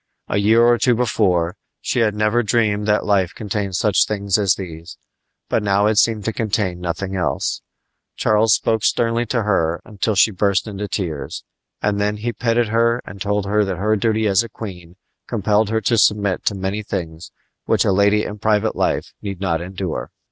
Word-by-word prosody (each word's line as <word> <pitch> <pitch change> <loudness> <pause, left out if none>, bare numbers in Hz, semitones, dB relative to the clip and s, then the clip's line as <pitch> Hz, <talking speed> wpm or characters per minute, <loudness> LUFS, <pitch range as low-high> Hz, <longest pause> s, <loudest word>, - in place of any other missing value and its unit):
A - - -1
year 110 +3 +4
or 120 0 +4
two 125 -2 +3
before, 95 -7 +1 0.2
she - - -1
had 110 -3 +2
never 105 +3 +2
dreamed 105 -2 0
that 105 0 +2
life 95 -4 +1
contained 100 -2 -3
such 100 0 +2
things 100 -2 -1
as 100 -3 +3
these; 85 -2 -9 0.5
but - - 0
now 100 0 +2
it 105 0 +3
seemed 110 -4 +1
to 110 - -1
contain 105 -5 -1
nothing 90 +2 -4
else. 90 -2 -1 0.5
Charles 110 0 +3
spoke 110 -1 0
sternly 115 +2 +1
to 120 0 0
her 85 -5 +1
until 105 0 -2
she 110 - +5
burst 100 +1 0
into 105 -1 -5
tears, 85 -7 -4 0.4
and 105 0 0
then 105 +1 0
he 115 +3 -3
petted 115 -1 0
her 115 +1 +2
and 100 -1 -10
told 105 -1 0
her 105 +1 +2
that 95 -3 -3
her 105 +3 +1
duty 110 +1 0
as 100 -1 +3
a 115 - -7
queen 90 -5 -9 0.3
compelled 105 -1 +1
her 110 0 0
to 115 +2 +2
submit 105 -3 +2
to 105 - +1
many 95 +2 -3
things 85 -5 -5 0.4
which - - +2
a - - +3
lady 100 +2 +3
in 105 - -6
private 110 0 +1
life - - -1
need 100 -3 -5
not 85 -4 -1
endure. 95 -1 -5
105 Hz, 190 wpm, -20 LUFS, 95-110 Hz, 0.5 s, she